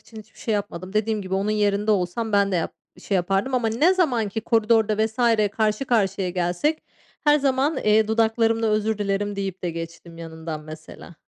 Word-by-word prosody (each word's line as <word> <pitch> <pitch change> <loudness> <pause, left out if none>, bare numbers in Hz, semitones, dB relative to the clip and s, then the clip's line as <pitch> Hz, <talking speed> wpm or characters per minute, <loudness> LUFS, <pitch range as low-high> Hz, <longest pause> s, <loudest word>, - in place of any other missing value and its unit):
için 220 - -13
hiçbir 215 0 -15
şey 225 - -1
yapmadım. 190 -2 -4
Dediğim 215 0 0
gibi, 190 0 -4
onun 195 +2 0
yerinde 210 0 +1
olsam 210 +3 -1
ben 200 -1 +3
de - - +2
yap 165 - -2 0.3
şey 200 - -3
yapardım. 195 +8 0
Ama 240 -3 +1
ne 300 +12 +3
zamanki 235 - 0
koridorda 220 -1 +2
vs. 220 0 -11 0.4
karşı 215 +3 0
karşıya 195 -6 0
gelsek, 180 - -1 0.4
her 295 0 +5
zaman, 275 +2 +1
eee, 215 0 +3
dudaklarımda 225 0 +2
"Özür 215 0 0
dilerim." 205 0 -1
deyip 195 -2 -4
de 175 - -1
geçtim 165 0 -8
yanından 160 -1 -7
mesela. 155 +2 -11
210 Hz, 175 wpm, -23 LUFS, 190-225 Hz, 0.4 s, her